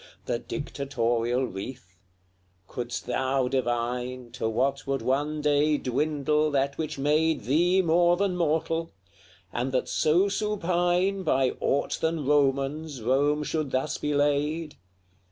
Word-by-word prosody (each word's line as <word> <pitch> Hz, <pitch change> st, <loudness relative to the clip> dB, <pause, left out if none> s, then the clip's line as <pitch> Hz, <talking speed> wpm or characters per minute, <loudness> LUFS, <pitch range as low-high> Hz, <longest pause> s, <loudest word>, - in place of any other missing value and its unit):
The 120 Hz, -, -1 dB
dictatorial 125 Hz, -4 st, -1 dB
wreath, 100 Hz, -1 st, -8 dB, 0.7 s
couldst 120 Hz, -1 st, -5 dB
thou 130 Hz, +1 st, 0 dB
divine 125 Hz, -1 st, -2 dB
To 110 Hz, -, -2 dB
what 135 Hz, +5 st, -1 dB
would 135 Hz, 0 st, -1 dB
one 145 Hz, +3 st, 0 dB
day 150 Hz, 0 st, +3 dB
dwindle 150 Hz, +3 st, 0 dB
that 140 Hz, -1 st, 0 dB
which 155 Hz, -3 st, -3 dB
made 150 Hz, +2 st, +2 dB
Thee 175 Hz, -, +3 dB
more 175 Hz, +1 st, +4 dB
than 195 Hz, -1 st, 0 dB
mortal? 165 Hz, 0 st, 0 dB, 0.6 s
and 125 Hz, +2 st, -1 dB
that 130 Hz, -, 0 dB
so 170 Hz, +6 st, +3 dB
supine 190 Hz, -2 st, 0 dB
By 135 Hz, -7 st, +2 dB
aught 140 Hz, -, 0 dB
than 160 Hz, -2 st, 0 dB
Romans 140 Hz, 0 st, +1 dB
Rome 145 Hz, +5 st, +2 dB
should 155 Hz, -1 st, -2 dB
thus 130 Hz, +4 st, -1 dB
be 150 Hz, 0 st, -1 dB
laid? 145 Hz, +2 st, 0 dB
145 Hz, 125 wpm, -27 LUFS, 130-160 Hz, 0.7 s, more